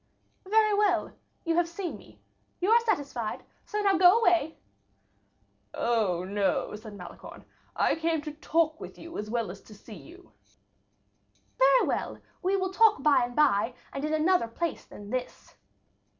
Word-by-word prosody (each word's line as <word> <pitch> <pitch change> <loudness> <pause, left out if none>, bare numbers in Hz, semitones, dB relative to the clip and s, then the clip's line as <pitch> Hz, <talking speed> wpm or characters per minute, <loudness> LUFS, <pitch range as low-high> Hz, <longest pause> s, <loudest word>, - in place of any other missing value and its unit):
"Very 430 0 +4
well, 400 -5 +1 0.3
you 330 - +1
have 345 -1 +2
seen 345 0 -5
me, - - -16 0.4
you 375 +4 +1
are 465 - +7
satisfied; 285 - -2 0.2
so 420 -1 -2
now 395 -3 +2
go 365 +3 +7
away." 345 -7 +2 1.2
"Oh, 210 -7 0
no," 200 +2 -1
said 215 -1 -10
Malicorne; 180 -2 -11 0.3
"I - - +2
came 325 0 0
to 300 - -5
talk 315 +1 0
with - - -10
you 335 0 -11
as 210 +1 -5
well 230 -4 -2
as 195 - -12
to 215 - -15
see 215 +2 -13
you." 360 - -14 1.3
"Very - - +5
well, - - -2 0.2
we 385 0 +1
will 375 0 -2
talk 440 +1 +4
by 290 -5 +4
and 245 0 -9
by, 245 -5 +2 0.2
and 275 - -5
in 305 - -1
another 320 -4 +2
place 330 +8 -4
than 205 0 -11
this." 255 -1 -5
320 Hz, 160 wpm, -28 LUFS, 230-375 Hz, 1.3 s, are